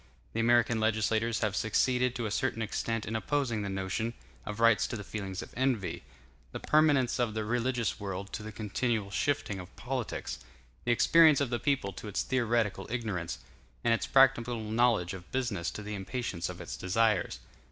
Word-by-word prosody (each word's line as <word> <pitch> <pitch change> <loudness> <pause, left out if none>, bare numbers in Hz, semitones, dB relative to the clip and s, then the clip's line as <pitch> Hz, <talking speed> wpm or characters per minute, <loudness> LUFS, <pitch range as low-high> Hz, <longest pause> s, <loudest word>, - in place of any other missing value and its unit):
The - - -2
American 120 0 +3
legislators 110 +1 +1
have 105 -2 0
succeeded 125 +5 +1
to 120 - -2
a 105 - -2
certain 115 0 0
extent 115 +1 -2
in 110 - -4
opposing 120 -2 0
the 100 - -3
notion 95 +4 -2 0.3
of 105 0 -5
rights 115 -1 +5
to 120 - -4
the 105 - -6
feelings 95 -3 -5
of - - -13
envy; 125 -7 0 0.5
the - - -4
permanence 145 -5 +3
of 115 -3 0
the 110 -1 -1
religious 120 0 0
world 100 -1 -5
to - - -3
the 110 +1 -7
continual 110 -1 -1
shifting 140 -5 -1
of 90 +1 -10
politics; 125 -2 -4 0.5
the 120 - +2
experience 155 +4 +6
of 140 -4 -1
the 120 - 0
people 135 -9 0
to 105 - -8
its 105 - -1
theoretical 115 -6 0
ignorance; 105 -8 -3 0.5
and 115 - +4
its 115 - -1
practical 125 -3 +4
knowledge 110 -4 +1
of 95 -1 -10
business 120 -9 -1
to 105 - -7
the 105 +1 -5
impatience 100 -3 -3
of 90 -1 -7
its 85 - -6
desires. 105 0 +1
115 Hz, 180 wpm, -30 LUFS, 100-120 Hz, 0.5 s, experience